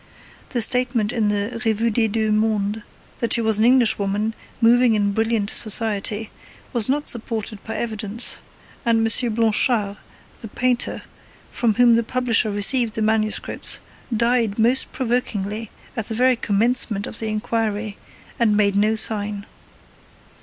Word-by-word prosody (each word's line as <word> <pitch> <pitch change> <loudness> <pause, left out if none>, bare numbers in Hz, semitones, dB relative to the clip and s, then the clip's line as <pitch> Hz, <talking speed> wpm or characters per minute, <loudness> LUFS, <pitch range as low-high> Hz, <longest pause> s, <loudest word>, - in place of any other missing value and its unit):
The 240 -4 0
statement 240 -2 +1
in 220 -3 +1
the 210 +3 -2
Revue 225 0 +1
des 225 +1 +2
Deux 220 0 -1
Mondes 215 0 0 0.4
that 235 - +1
she 235 - +4
was 220 -2 +2
an 220 - +4
Englishwoman, 220 -4 +2 0.3
moving 235 0 +4
in 205 -1 +1
brilliant 225 -1 0
society, 215 0 -1 0.4
was 235 -1 +2
not 290 +2 0
supported 220 -3 -3
by 225 - -6
evidence; 220 0 -1 0.4
and 225 -1 +2
M. 235 0 +2
Blanchard, 220 -2 +2 0.4
the 225 - -7
painter, 245 +3 -1 0.5
from 225 -3 0
whom 240 0 +5
the 230 - +4
publisher 235 -1 0
received 215 +3 +1
the 220 - -1
manuscripts, 215 0 -1 0.3
died 235 -2 +1
most 240 +4 +3
provokingly 225 -4 -2 0.3
at 225 -4 -4
the 225 - -4
very 255 +2 +3
commencement 220 -1 0
of - - -6
the 220 - -2
inquiry, 215 -1 -2 0.4
and 215 -3 +3
made 200 -1 +2
no 210 +2 +2
sign. 210 -2 -1
225 Hz, 140 wpm, -21 LUFS, 210-235 Hz, 0.5 s, whom